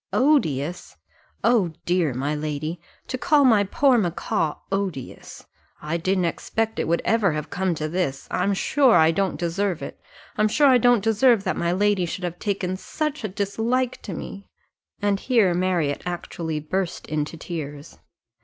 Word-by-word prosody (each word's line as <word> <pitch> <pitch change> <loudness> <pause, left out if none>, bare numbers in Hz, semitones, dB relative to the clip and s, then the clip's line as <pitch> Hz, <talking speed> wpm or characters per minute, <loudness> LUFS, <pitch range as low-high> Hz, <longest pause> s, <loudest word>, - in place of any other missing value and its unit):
"Odious! 175 - +1 0.5
O 200 -9 +3
dear, 175 -4 +1
my 140 +4 -1
lady! 155 +2 -4 0.2
to 255 - -4
call 290 0 +4
my 220 -5 +5
poor 250 +5 +3
macaw 170 -4 -1 0.2
odious! 195 -9 -4 0.3
I 155 +3 -2
didn't 185 +1 0
expect 220 +6 -2
it - - -1
would 170 +1 +1
ever 215 -7 +2
have 150 -1 -5
come 185 -2 0
to 155 0 -3
this 155 -5 -2
I - - 0
am 200 +2 +1
sure 265 +4 +3
I 160 -1 +5
don't 190 +3 -1
deserve 175 -1 -1
it - - -8 0.4
I'm 215 - +4
sure 290 +7 +3
I 260 -3 +6
don't 245 -3 +4
deserve 225 0 +4
that 185 -5 -1
my 170 0 0
lady 195 -1 +1
should 185 +3 -5
have 175 0 -4
taken 190 -3 -2
such 300 +6 -4
a - - 0
dislike 225 +6 -1
to 190 - -6
me." 200 +5 -8 0.5
And 200 -1 +2
here 225 -8 +3
Marriott 175 -5 0
actually 170 -2 -4
burst 175 +4 -3
into 155 +1 -3
tears. 150 -3 -7
185 Hz, 165 wpm, -23 LUFS, 165-215 Hz, 0.5 s, I